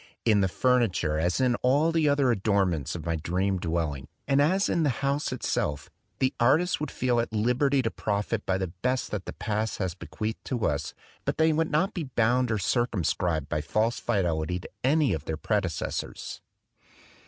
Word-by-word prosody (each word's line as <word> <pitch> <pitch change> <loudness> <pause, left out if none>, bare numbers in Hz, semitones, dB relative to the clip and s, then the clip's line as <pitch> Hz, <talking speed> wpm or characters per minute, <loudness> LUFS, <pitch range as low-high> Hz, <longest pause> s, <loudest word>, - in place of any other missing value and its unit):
In 105 -3 +4
the 95 - +3
furniture, 95 -9 +1
as 85 +2 +1
in 130 -2 +3
all 145 +6 +3
the 160 -2 +2
other 140 -3 +3
adornments 95 - 0
of 85 - -6
my 85 -1 0
dream 95 +4 -1
dwelling, 80 -6 -2 0.2
and 140 0 +4
as 185 +7 +3
in 170 - +1
the 150 - +3 0.2
house 140 +1 0
itself, 75 - -2 0.3
the 130 0 +1
artists 155 +9 +3
would 150 -1 -3
feel 125 -2 0
at 115 - -1
liberty 125 +5 +2
to 115 - -1
profit 105 +1 -2
by 95 - 0
the 95 -3 -3
best 125 0 0
that 100 -3 -3
the - - -6
past 110 0 -2
has 95 -4 -2
bequeathed 110 +4 -5
to 120 -5 -1
us, 70 -2 -1 0.3
but - - -2
they 160 0 +4
would 160 +1 +1
not 185 +7 +1
be 170 -5 -3
bound 125 0 +2
or 110 - +1
circumscribed 90 - 0
by 75 - -1
a - - -3
false 110 +9 0
fidelity 90 -5 0
to - - -10
any 145 +2 +3
of 80 -1 -4
their 80 - -3
predecessors. 95 -4 -3
110 Hz, 190 wpm, -27 LUFS, 90-130 Hz, 0.3 s, In